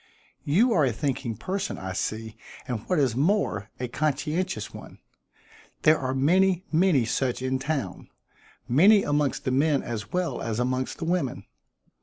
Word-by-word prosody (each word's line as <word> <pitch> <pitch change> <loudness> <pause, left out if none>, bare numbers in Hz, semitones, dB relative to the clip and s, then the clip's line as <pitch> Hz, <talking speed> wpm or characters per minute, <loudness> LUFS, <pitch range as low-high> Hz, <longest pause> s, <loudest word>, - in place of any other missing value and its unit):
"You 220 - +3
are 155 - +3
a 130 - +2
thinking 130 -2 -3
person, 190 - -3
I 95 0 -5
see, 110 +3 -3 0.3
and 120 -3 -2
what 180 - +2
is 130 -6 +2
more, 140 - +1
a 125 - -2
conscientious 155 +7 -2
one. - - -11 0.9
There 155 0 +5
are 130 -1 -2
many, 180 +6 +3
many 160 -6 +3
such 125 +2 -1
in 130 0 0
town; 135 - -3 0.6
many 195 - +6
amongst 145 -2 0
the 130 - 0
men 140 +2 +2
as 110 -3 -5
well 180 -1 -1
as 115 -1 -2
amongst 130 +1 -1
the - - -4
women. 170 -7 -1
140 Hz, 155 wpm, -26 LUFS, 125-170 Hz, 0.9 s, many